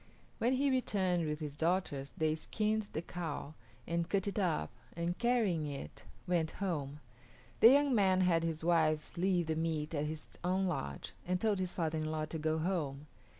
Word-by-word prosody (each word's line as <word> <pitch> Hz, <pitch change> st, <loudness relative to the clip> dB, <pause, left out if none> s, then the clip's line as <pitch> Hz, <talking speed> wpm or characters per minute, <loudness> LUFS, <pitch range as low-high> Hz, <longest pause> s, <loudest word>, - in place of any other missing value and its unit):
When 245 Hz, +3 st, +2 dB
he 275 Hz, +1 st, +2 dB
returned 185 Hz, -9 st, +1 dB
with 150 Hz, +1 st, -3 dB
his 145 Hz, -2 st, -4 dB
daughters 160 Hz, -4 st, -1 dB
they 155 Hz, -1 st, +2 dB
skinned 215 Hz, +6 st, -1 dB
the 160 Hz, -, -3 dB
cow 160 Hz, -4 st, -5 dB, 0.3 s
and 170 Hz, 0 st, -1 dB
cut 200 Hz, 0 st, +1 dB
it 200 Hz, -, -1 dB
up 165 Hz, -, 0 dB, 0.2 s
and, 170 Hz, +1 st, -1 dB
carrying 215 Hz, -11 st, +1 dB
it, 140 Hz, -, -7 dB, 0.2 s
went 170 Hz, -3 st, +1 dB
home. 150 Hz, -7 st, -2 dB, 0.6 s
The 225 Hz, -, +10 dB
young 285 Hz, 0 st, +4 dB
man 190 Hz, -4 st, +4 dB
had 175 Hz, -3 st, +3 dB
his 165 Hz, -1 st, -2 dB
wives 160 Hz, -2 st, +2 dB
leave 180 Hz, -1 st, +2 dB
the 160 Hz, 0 st, -1 dB
meat 160 Hz, -1 st, -1 dB
at 150 Hz, -1 st, 0 dB
his 155 Hz, 0 st, -7 dB
own 185 Hz, +2 st, +1 dB
lodge 70 Hz, -, -3 dB
and 180 Hz, 0 st, +1 dB
told 210 Hz, -2 st, +1 dB
his 185 Hz, -1 st, -1 dB
father 160 Hz, -2 st, -1 dB
in 155 Hz, -, -2 dB
law 155 Hz, 0 st, -1 dB
to 160 Hz, +1 st, -5 dB
go 155 Hz, +1 st, +1 dB
home. 155 Hz, -5 st, -2 dB
170 Hz, 185 wpm, -34 LUFS, 155-190 Hz, 0.6 s, The